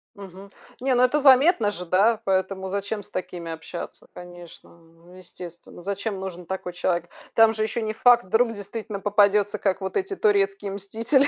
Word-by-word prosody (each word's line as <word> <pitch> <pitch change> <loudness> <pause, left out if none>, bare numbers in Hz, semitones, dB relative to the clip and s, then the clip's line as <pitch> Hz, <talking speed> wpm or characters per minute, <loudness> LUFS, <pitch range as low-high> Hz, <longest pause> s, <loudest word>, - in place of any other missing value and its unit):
Мгм, 195 0 -11 0.3
не, 260 0 +1
ну, 245 - +4
это 255 +4 +3
заметно 270 - +5
же, 180 -3 -5
да, 210 +6 +3
поэтому 190 0 -1
зачем 200 +2 -3
с - - -7
такими 175 -2 -5
общаться, 165 +2 -8
конечно, 175 -1 -12 0.4
э, - - -14
естественно. 175 -1 -11
Зачем 200 +1 -3
нужен 180 -2 -7
такой 185 0 -5
человек? 175 -1 -1 0.2
Там 225 0 +5
же 215 0 -1
ещё 225 +2 -2
не 215 - -2
факт, 240 +2 +5
вдруг 230 +5 +1
действительно 205 0 -6
попадётся 205 0 +3
как 195 -1 0
вот 190 - -3
эти 395 0 -2
турецкие 400 - +1
мстители, 230 +8 +1
200 Hz, 170 wpm, -24 LUFS, 185-230 Hz, 0.4 s, заметно